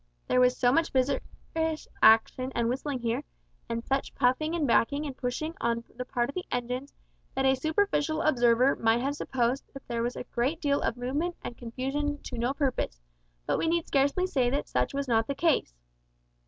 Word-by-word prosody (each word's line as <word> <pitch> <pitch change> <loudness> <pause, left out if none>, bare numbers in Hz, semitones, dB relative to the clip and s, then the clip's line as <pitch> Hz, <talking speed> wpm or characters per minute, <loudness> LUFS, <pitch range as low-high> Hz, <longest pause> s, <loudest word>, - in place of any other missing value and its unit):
There 250 - +3
was 250 0 +4
so 245 -1 +4
much 330 +4 +2
vigorous 310 +4 -1
action 225 +4 +5
and 235 -1 +1
whistling 260 +1 -2
here, 230 -1 -1 0.5
and 230 0 -3
such 270 0 -1
puffing 310 +7 +2
and 320 -4 +1
backing 280 +4 +2
and 275 -3 -5
pushing 265 +6 -3
on 235 0 0
the 250 +1 -5
part 240 -2 0
of 280 - -6
the 365 - -3
engines, 250 +3 -3 0.4
that 270 0 +1
a 265 - +5
superficial 315 +2 0
observer 245 -2 +4
might 225 +1 +2
have 275 +2 0
supposed 255 -1 0 0.2
there 235 -1 -2
was 240 +1 -1
a - - -5
great 255 +7 -1
deal 285 -3 +1
of 230 - -1
movement 290 +8 -2
and 240 - -5
confusion 270 +5 -3
to 245 - -6
no 240 +3 +1
purpose, 260 - -1 0.5
but - - 0
we - - 0
need 335 0 +1
scarcely 285 +6 +2
say 260 -9 +1
that 280 +3 -1
such - - 0
was 280 0 -2
not 225 -2 +2
the 280 - -2
case. 310 - +1
260 Hz, 190 wpm, -28 LUFS, 240-290 Hz, 0.5 s, action